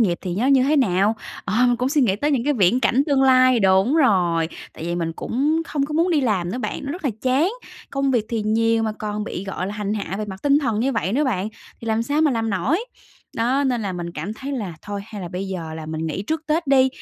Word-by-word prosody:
nghiệp 180 -6 +2
thì 180 -2 -4
nó 230 +8 0
như 275 -2 +5
thế 290 +4 +2
nào? 205 -4 +3 0.3
Ờ, - - -2
mình 245 0 +2
cũng 250 +2 0
suy 295 +2 +2
nghĩ 210 -7 +2
tới 290 +8 0
những 260 -5 +1
cái 295 - +2
viễn 230 0 +3
cảnh 265 +1 +3
tương 280 -3 +3
lai 255 -2 +5
đúng 190 +7 +4
rồi, 175 - +3 0.2
tại - - -8
vì 170 +1 -2
mình 165 -1 -2
cũng 295 - 0
không 280 -2 -1
có 300 - -6
muốn 335 +3 +2
đi 310 - +3
làm 200 -9 0
nữa 245 - -3
bạn, 255 - -4
nó 280 - -3
rất 355 -1 -8
là 275 - +2
chán. 265 +8 +2 0.4
Công 275 -1 0
việc 235 -4 +1
thì 225 -2 -1
nhiều 225 +1 +2
mà 220 -1 -1
còn 210 0 -3
bị, 190 - -5
gọi 190 -2 -4
là, 200 - -4
hành 210 0 -2
hạ 200 -3 -4
về 215 - -2
mặt 190 -2 -8
tinh 285 0 +4
thần 230 -7 -1
như 265 +3 +1
vậy 200 -4 -1
nữa 290 +5 +2
bạn, 210 -6 -1 0.3
thì 230 - -8
làm 220 0 +1
sao 285 +6 0
mà 310 -2 +4
làm 225 -3 -1
nổi? 275 - 0 0.5
Đó, 255 +5 +1
nên 250 -4 0
là 195 -2 -2
mình 175 -1 -5
cảm 170 +6 -5
thấy 270 +5 -6
là 205 -11 -4
thôi, 205 -1 -5
hay 215 -2 -8
là 175 - -5
bây 185 +2 -4
giờ 165 -4 -5
là 160 -1 -7
mình 160 +1 -3
nghỉ 160 +4 -3
trước 315 +9 -2
Tết 320 +2 0
đi, 265 -1 +5
225 Hz, 275 wpm, -22 LUFS, 195-275 Hz, 0.5 s, như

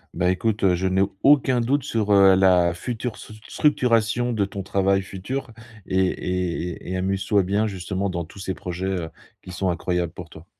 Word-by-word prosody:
Bah, 90 +1 +2
écoute, 105 +3 -1
heu, 95 -2 +4
je 95 +2 0
n'ai 95 +1 +2 0.2
aucun 130 -3 +4
doute 135 +3 0
sur, 110 -6 -1
heu, 95 -1 +7
la 90 -2 +4
future 120 +5 -4
stru 110 - -12
structuration 120 -4 +1
de 105 -3 +1
ton 100 0 -5
travail 95 0 +1
futur 110 +8 -5 0.3
et 95 - 0
et 90 -1 -2 0.2
et - - -4
et - - -1
amuse-toi 95 +1 +1
bien, 100 +4 0
justement, 95 0 -3
dans 85 -2 -3
tous 85 - -14
ces 95 -1 -4
projets, 90 +1 -5
heu, 90 -4 -2 0.3
qui 95 - -10
sont 90 +1 -1
incroyables 90 -1 -1
pour 90 - -9
toi. 80 +2 -13
95 Hz, 195 wpm, -23 LUFS, 90-110 Hz, 0.3 s, heu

